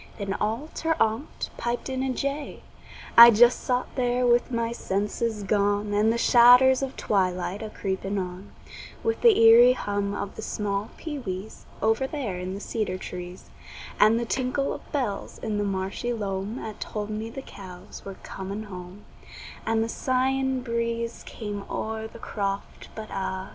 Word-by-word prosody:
Then 200 -2 -3
all 225 +9 -1
ter 325 0 0
onct 225 +6 -1
piped 240 +1 -2
in 260 -1 -2
a 265 0 0
jay. 280 +3 -4 0.5
I 235 0 +12
just 240 +2 +5
sot 250 0 0
there 250 -1 +1
with 240 +1 +3
my 230 -1 -1
senses 210 0 -2
gone, 205 +1 +1
And 210 +2 +3
the 235 - 0
shadders 250 +3 +7
of 270 -1 -4
twilight 185 -1 0
a 220 - -5
creepin' 195 -1 -3
on, 185 +1 -5 0.5
With 455 0 -1
the 465 -3 +6
eerie 235 +2 +8
hum 205 -4 -2
of 200 0 -5
the - - -7
small 205 0 -2
pee 295 -3 -5
wees, 195 -2 -7 0.2
Over 225 +4 +2
there 245 -12 -4
in 185 +1 -4
the - - -6
cedar 210 -3 -2
trees, 180 0 -8 0.5
And 220 +2 +5
the 235 - -2
tinkle 260 +5 -1
of - - -11
bells 245 -9 -3
in 210 -1 -3
the - - +1
marshy 195 +4 -2
loam 200 0 -3
'At 215 -4 -7
told 210 0 -4
me 215 +1 -4
the 265 +3 -8
cows 185 -6 -11
were 195 -1 -8
coming 195 +3 -6
home, 185 0 -10 0.6
And 225 0 +2
the - - -2
sighing 260 +2 0
breeze 235 -1 -2
came 205 -3 -5
o'er 220 0 -3
the 225 - -13
croft, 200 -3 -4
But 215 -1 -7
ah! 190 0 -3
220 Hz, 170 wpm, -26 LUFS, 200-245 Hz, 0.6 s, I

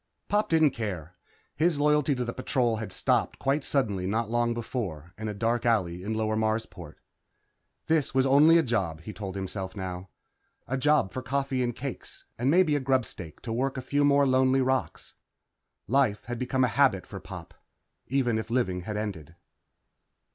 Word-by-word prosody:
Pop 210 +1 +1
didn't 160 -3 +4
care. 95 -8 -5 0.4
His 160 -1 +2
loyalty 150 -1 +3
to 125 -1 -2
the 120 - -4
Patrol 125 -3 0
had 110 0 -5
stopped - - +1
quite 140 +2 0
suddenly 105 -11 0
not 110 +2 -1
long 120 0 +1
before 95 - -5
in 110 +1 -5
a 105 - -3
dark 115 +3 0
alley 95 -7 +1
in 110 +4 -3
Lower 110 0 0
Marsport. 110 -7 -2 0.9
This 160 -3 +1
was 130 0 +2
only 145 +5 +6
a 165 - +4
job, 95 - -1
he 105 - -8
told 100 -3 -6
himself 95 -1 -5
now. 95 -1 -6 0.6
A 130 - -1
job 140 -6 +2
for 130 - -4
coffee 135 0 -1
and 120 -2 -1
cakes, 135 -1 -7
and 125 +3 +1
maybe 165 -1 +4
a - - +1
grubstake 130 - -2
to 115 - -4
work 135 +3 -1
a - - -2
few 145 +2 +1
more 140 0 +4
lonely 130 0 +3
rocks. 130 0 -2 0.7
Life 125 -3 +1
had 120 +1 -5
become 130 +1 0
a - - +4
habit 120 -10 +4
for - - -8
Pop, - - -10 0.5
even 120 -4 +1
if 110 +1 -6
living 100 -7 0
had 105 +4 -5
ended. 85 -7 -5
120 Hz, 175 wpm, -27 LUFS, 100-135 Hz, 0.9 s, only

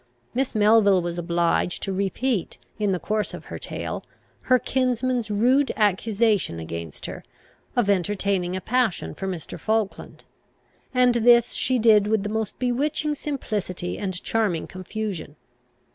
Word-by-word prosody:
Miss 260 -1 -1
Melville 205 -3 +5
was 175 0 -3
obliged 170 0 0
to 195 - -2
repeat, 200 +2 -1 0.2
in 205 -2 +1
the 185 - +1
course 215 +4 -2
of - - -11
her - - -5
tale, - - -5 0.5
her 255 - +7
kinsman's 250 -1 0
rude 250 +7 +3
accusation 210 - +1
against 80 -1 -6
her, - - -7 0.5
of 240 -4 +2
entertaining 195 -1 0
a 185 - -3
passion 245 -3 0
for 195 - -5
Mr. 180 -4 -5
Falkland; 220 -2 -2 0.7
and 250 -1 +4
this 235 0 +5
she 255 - +1
did 215 -3 +5
with 215 -2 +1
the 205 - -3
most 220 -1 -3
bewitching 290 +5 0
simplicity 210 -12 -3
and 185 -3 -4
charming 210 -8 0
confusion. 185 -4 -5
210 Hz, 140 wpm, -24 LUFS, 185-240 Hz, 0.7 s, her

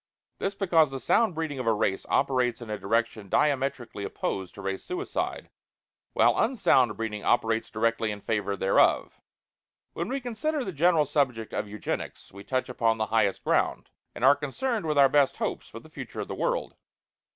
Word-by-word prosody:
This 195 0 -2
because 170 -7 +3
the 135 0 -5
sound 220 - +2
breeding 155 -4 -3
of 125 - -3
the 115 - +3
race 100 -2 -1
operates 125 -2 +1
in 115 -3 -8
a 105 - -3
direction 110 0 -1
diametrically 135 -6 0
opposed 95 -2 -4
to 100 - -9
Race 95 0 -3
Suicide, 365 +2 -4 0.6
while - - +3
unsound 130 - +3
breeding 110 -2 -4
operates 115 -1 +1
directly 115 0 0
in 105 -1 -4
favor 105 -2 -2
thereof. 95 +1 +2 0.7
When 170 - -3
we 270 +2 -1
consider 270 +4 -2
the 190 - -3
general 165 0 +3
subject 130 -6 -1
of 105 - -2
Eugenics 105 0 -5
we 100 +1 -11
touch 130 +4 -1
upon 115 -3 +1
the 110 - 0
highest 105 -4 +2
ground, - - 0 0.2
and 125 - 0
are 140 +2 +7
concerned 170 - -2
with 150 -1 0
our 140 -1 +7
best 140 0 +2
hopes - - -3
for - - -9
the - - -16
future - - -7
of - - -5
the - - -5
world. - - -1
125 Hz, 180 wpm, -27 LUFS, 110-155 Hz, 0.7 s, are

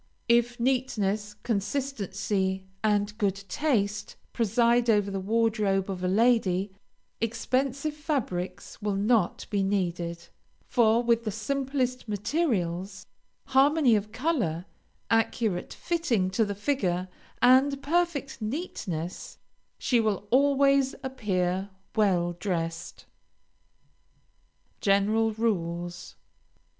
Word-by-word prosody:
If 240 +1 +3
neatness, 215 -5 0
consistency, 200 -5 -1 0.2
and 205 -1 +1
good 200 -3 +1
taste, 210 -4 -1 0.2
preside 235 +2 +2
over 205 -2 +3
the 195 - -2
wardrobe 210 -2 +1
of 185 -1 -5
a - - +1
lady, 200 -2 +2 0.5
expensive 260 +6 -1
fabrics 220 - -4
will 205 -1 -1
not 205 -1 +1
be 200 -2 +1
needed; 175 -3 -2 0.4
for 235 -1 +3
with 235 -1 +2
the 220 - -2
simplest 255 +3 -2
materials, 205 - -1 0.4
harmony 275 -1 +4
of 210 0 -2
color, 225 - -1 0.5
accurate 225 -4 +1
fitting 250 - 0
to 220 +3 +2
the 205 -1 -4
figure, 190 -6 -1 0.3
and 265 +3 +4
perfect 310 -5 0
neatness, 215 - -4 0.4
she 245 - +2
will 210 -2 -1
always 275 0 +4
appear 195 -7 -1 0.3
well 180 -5 +2
dressed. 165 -4 -3 1.7
GENERAL 215 +3 +2
RULES. 175 -6 -2
215 Hz, 95 wpm, -27 LUFS, 195-255 Hz, 1.7 s, harmony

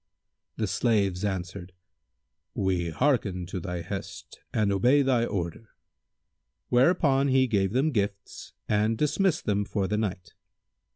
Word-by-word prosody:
The 110 - -1
slaves 100 -3 +1
answered, 95 -2 -4 0.8
"We 90 -3 0
hearken 100 - 0
to 90 +1 -5
thy 90 0 -4
hest 95 +3 -7
and 105 -2 +1
obey 125 +9 +4
thy 125 -3 +2
order." 100 +1 -5 0.9
Whereupon 135 +1 +3
he 130 -1 +4
gave 100 -5 0
them 140 +5 +2
gifts 100 -4 -4
and 110 +1 +1
dismissed 160 - +1
them 105 -1 +1
for 100 -1 -2
the 105 - -1
night. 95 -4 -3
105 Hz, 125 wpm, -27 LUFS, 95-130 Hz, 0.9 s, obey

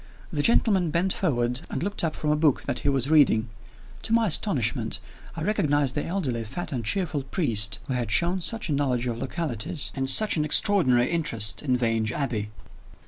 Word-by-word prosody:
The 145 - 0
gentleman 190 -2 +2
bent 175 +4 0
forward, 125 -7 -1
and - - -4
looked 205 0 -1
up 160 -2 -1
from 150 - -1
a - - +3
book 150 -3 +1
that 120 - -3
he 145 - 0
was 135 +1 +1
reading. 120 -7 +4 0.5
To 225 - -1
my 230 0 +3
astonishment, 125 - 0 0.4
I 165 - -5
recognized 145 -8 +1
the 145 - -2
elderly, 145 -11 -3
fat 175 +11 -6
and 125 -4 -3
cheerful 160 - 0
priest 115 - 0
who 130 - -3
had 120 -3 -2
shown 175 - +2
such 225 +4 -1
a 155 - -1
knowledge 130 -4 0
of 120 -2 -3
localities, 140 -1 -3
and 135 -1 -2
such 215 +7 +3
an 150 - +1
extraordinary 150 - +2
interest 115 -11 +3
in 130 -4 0
Vange 115 -2 0
Abbey! 120 -7 -3
145 Hz, 190 wpm, -25 LUFS, 120-170 Hz, 0.5 s, reading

